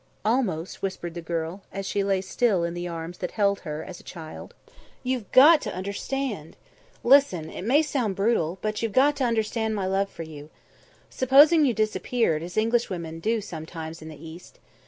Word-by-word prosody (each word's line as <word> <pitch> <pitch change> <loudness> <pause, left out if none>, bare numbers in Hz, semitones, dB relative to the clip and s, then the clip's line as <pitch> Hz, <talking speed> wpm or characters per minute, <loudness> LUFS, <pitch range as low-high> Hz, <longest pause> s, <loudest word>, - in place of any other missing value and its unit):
"Almost," 210 -8 -1
whispered 185 -3 -4
the 170 - -6
girl, 165 +3 -4
as 195 0 -5
she 200 +1 0
lay 195 -1 +1
still 195 -1 +1
in 170 0 -2
the 175 0 -4
arms 170 +1 -6
that 180 - -3
held 200 -2 +2
her 155 -2 -5
as 175 - -9
a - - -16
child. 160 -3 -10 0.5
"You've 250 -5 -3
got 300 +5 +8
to 210 - -5
understand. 200 - -4 0.5
Listen! 235 - +4
It - - -7
may 280 +7 +4
sound 250 -10 -1
brutal, 195 -5 +1
but 215 0 -2
you've 225 -3 -2
got 285 +5 +4
to 265 - +1
understand 220 -1 0
my 195 -2 -2
love 195 +1 0
for 165 - -8
you. 150 -2 -10 0.6
Supposing 290 +5 +6
you 245 -5 +1
disappeared, 215 -5 0
as 175 +3 -7
Englishwomen 195 -8 0
do 220 +5 0
sometimes 160 -2 -7
in 160 - -9
the 155 - -10
East. 165 +2 -12
195 Hz, 180 wpm, -25 LUFS, 170-235 Hz, 0.6 s, got